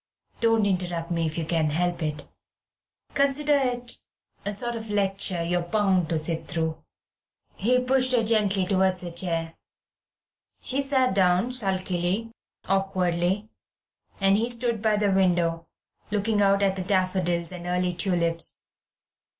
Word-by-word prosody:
Don't 225 -2 +3
interrupt 175 -3 -1
me 165 -1 0
if 155 - -4
you 165 - -2
can 160 -1 +1
help 175 +3 -1
it. 150 -1 -4 0.9
Consider 280 +1 +2
it 245 -3 -2 0.5
a 205 - -2
sort 240 +4 -2
of 225 -1 -7
lecture 195 -3 +1
you're 175 +1 0
bound 185 -2 +1
to 165 - 0
sit 160 +1 -3
through." 160 -1 -2 0.7
He 250 +6 +2
pushed 255 0 +2
her 235 -2 +3
gently 210 -4 +2
towards 190 -1 +2
a 175 - -5
chair. 165 -2 -1 1.1
She 270 +2 +2
sat 265 -4 +2
down 185 +4 +2
sulkily, 190 -1 0 0.4
awkwardly, 190 +1 0 0.7
and 195 0 +4
he 230 +3 0
stood 235 -2 0
by 215 -1 +2
the 205 -1 +1
window, 170 -3 +1 0.4
looking 210 +1 0
out 200 0 +3
at 195 -1 +2
the 185 - -2
daffodils 185 -2 0
and 175 -1 -7
early 180 0 0
tulips. 170 -2 -1
190 Hz, 140 wpm, -25 LUFS, 175-220 Hz, 1.1 s, and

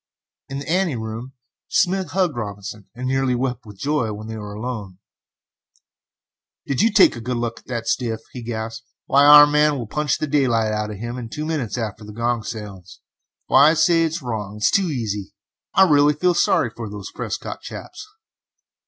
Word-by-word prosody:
In 135 - -4
the 140 - -6
ante 175 -3 +1
room 115 +3 -6 0.3
Smith 190 -2 +1
hugged 180 -2 0
Robinson, 100 -2 -6
and 125 +1 -4
nearly 135 -1 +1
wept 125 -2 -3
with 105 -2 -12
joy 140 -3 -1
when 105 +1 -7
they 110 0 -6
were 105 -1 -7
alone. 105 -5 -5 1.7
"Did 140 - 0
you 225 +2 +4
take 205 -8 +6
a 120 - -7
good 125 +1 -2
look 120 -1 -3
at - - -25
the 120 -3 -3
stiff?" 115 -2 -1
he 125 - -6
gasped. 115 0 -5 0.2
"Why, 140 +1 +4
our 145 0 +10
man 150 0 +3
will 120 - -4
punch 150 +6 -1
daylight 130 -7 +1
out 105 0 -2
of 105 - -6
him 120 +4 -5
in 115 -2 -7
two 150 +6 -5
minutes 140 -10 -2
after 110 -2 -4
the 105 0 -10
gong 120 +1 -1
sounds! 105 -5 -8 0.5
Why, 140 +3 +6
I - - +3
say 165 +1 +4
this 160 -1 -1
is 170 - -4
wrong 105 -4 -4
it 105 - -7
is - - +4
too 195 -2 +2
easy; 110 - -3 0.4
I 190 0 +7
really 145 -1 +4
feel 180 +4 +2
sorry 145 -8 +2
for 115 -3 -6
these 100 -2 -8
Prescott - - -5
chaps!" - - -9
120 Hz, 195 wpm, -22 LUFS, 110-145 Hz, 1.7 s, our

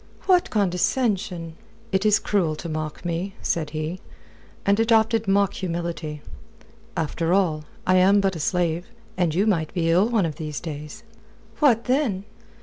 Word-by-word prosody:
"What 365 -2 +3
condescension!" 185 -4 0 0.3
"It 190 +2 +2
is 210 0 +5
cruel 175 -7 0
to 160 - -7
mock 155 +1 -5
me," 175 +3 -3
said 160 -3 -1
he, 155 +4 -4 0.7
and 200 +1 +3
adopted 225 -1 +3
mock 200 0 +3
humility. 170 -4 -4 0.7
"After 165 +2 0
all, 160 -6 +1 0.2
I 185 0 +4
am 195 +2 +5
but 195 -2 +1
a - - -5
slave. 175 +1 0 0.3
And 175 -4 0
you 195 +4 +3
might 165 -8 +1
be 165 -2 +1
ill 185 +7 +4
one 220 -6 +2
of 155 -3 -4
these 150 -2 -4
days." 150 -2 -7 0.6
"What, 240 -7 +4
then?" 250 -7 0
180 Hz, 150 wpm, -24 LUFS, 160-200 Hz, 0.7 s, is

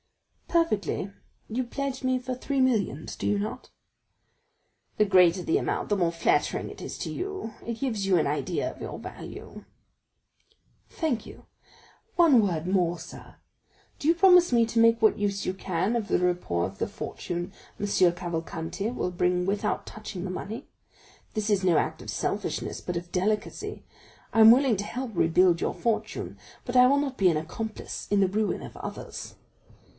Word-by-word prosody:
"Perfectly; 215 - 0 0.4
you 245 +4 -1
pledge 270 +2 -4
me 255 0 +2
for 255 +1 -4
three 275 +2 -2
millions, 220 - +1
do - - -3
you 205 - +2
not?" 210 - -5 1.3
"The 210 - +4
greater 180 -2 +5
the 160 - +2
amount, - - -2
the 205 - +3
more 175 -4 +1
flattering 165 - +1
it - - -11
is - - -6
to - - -3
you; 385 - -4
it 235 - -3
gives 225 -8 -1
you 185 -2 +4
an 160 - +2
idea 145 +1 -1
of - - -15
your - - -5
value." - - -9 1.3
"Thank 295 -9 -2
you. - - -13 0.7
One 315 -9 +6
word 170 -6 -1
more, 180 -2 +1
sir; 165 - -11 0.6
do 290 - -2
you 335 - +5
promise 360 -2 +6
me 235 -1 +4
to 230 0 -1
make 230 0 +5
what 220 -2 +4
use 200 -1 -1
you 185 - -1
can 190 +3 -1
of 225 -3 -1
the - - +2
report 175 - 0
of - - -21
the - - 0
fortune 175 +2 -5 0.3
M. 205 - -1
Cavalcanti 175 0 0
will 210 -6 -2
bring 180 0 +1
without 205 +2 -1
touching 210 -4 -7
the 185 - -3
money? 220 +7 -6 0.7
This 215 0 -1
is 200 -2 +2
no 175 -4 +4
act - - -1
of - - -9
selfishness, - - -2
but 180 - -3
of 175 +1 -7
delicacy. 210 +3 -2 0.5
I 225 - +5
am 220 - +10
willing 255 -1 +5
to 200 - -2
help 250 +3 -5
rebuild 170 0 +3
your - - -1
fortune, 230 -2 -2 0.3
but 245 - -4
I 250 0 +8
will 280 +2 +4
not 275 -2 -2
be 190 -2 +5
an 160 - +1
accomplice 215 +8 -5
in 205 - +3
the 195 - +4
ruin 210 +3 -1
of - - -9
others." - - -7
205 Hz, 175 wpm, -27 LUFS, 180-240 Hz, 1.3 s, am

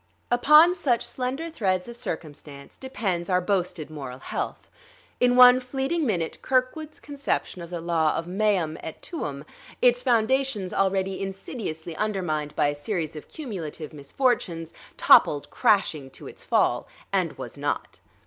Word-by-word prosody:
Upon 300 +8 +7
such 260 -10 0
slender 270 +6 -3
threads 185 - 0
of 235 - -8
circumstance 150 - -7
depends 195 -9 -3
our 180 -1 +3
boasted 180 -5 -2
moral 135 -4 -7
health. - - -5 0.5
In 245 0 +4
one 250 0 +9
fleeting 270 +5 -2
minute 170 -7 -2
Kirkwood's 270 +4 -1
conception 280 -10 -3
of 170 - -8
the 175 -2 -5
law 165 -2 +1
of 165 - -2
meum 180 -4 0
et 160 - -7
tuum, 145 - -5 0.3
its 245 0 +4
foundations 245 -4 +1
already 190 0 0
insidiously 190 -4 -5
undermined 175 -8 -2
by 145 - +2
a - - -1
series 160 +1 -3
of 150 - -9
cumulative 170 - -7
misfortunes, 165 - -1 0.2
toppled 145 -1 +5
crashing 155 -9 +2
to - - -12
its - - -10
fall; - - +1 0.3
and - - +1
was - - -8
not. - - -3
195 Hz, 140 wpm, -25 LUFS, 160-250 Hz, 0.5 s, one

